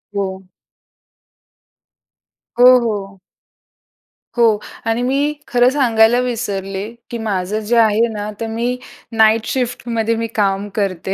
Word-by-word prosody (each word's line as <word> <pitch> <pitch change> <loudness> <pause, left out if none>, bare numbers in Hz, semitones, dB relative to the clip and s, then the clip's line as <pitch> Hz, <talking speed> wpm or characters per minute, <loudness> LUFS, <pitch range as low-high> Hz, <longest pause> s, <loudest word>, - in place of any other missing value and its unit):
हो. 190 -1 -3 2.2
हो, 245 - +7 0.2
हो. 195 -3 -4 1.2
हो 235 - +5 0.4
आणि 225 +2 0
मी 280 +4 +1
खरं 245 0 +4
सांगायला 240 -4 +3
विसरले, 205 -5 -3 0.2
की 240 - -4
माझं 210 -2 -2
जे 220 +2 -1
आहे 225 0 +4
ना, 210 0 -4
तर 225 - -3
मी 235 +3 -2 0.3
नाईट 220 0 +3
शिफ्टमध्ये 230 -3 -1
मी 230 0 -2
काम 200 -1 0
करते, 190 -2 -2
225 Hz, 115 wpm, -18 LUFS, 200-240 Hz, 2.2 s, हो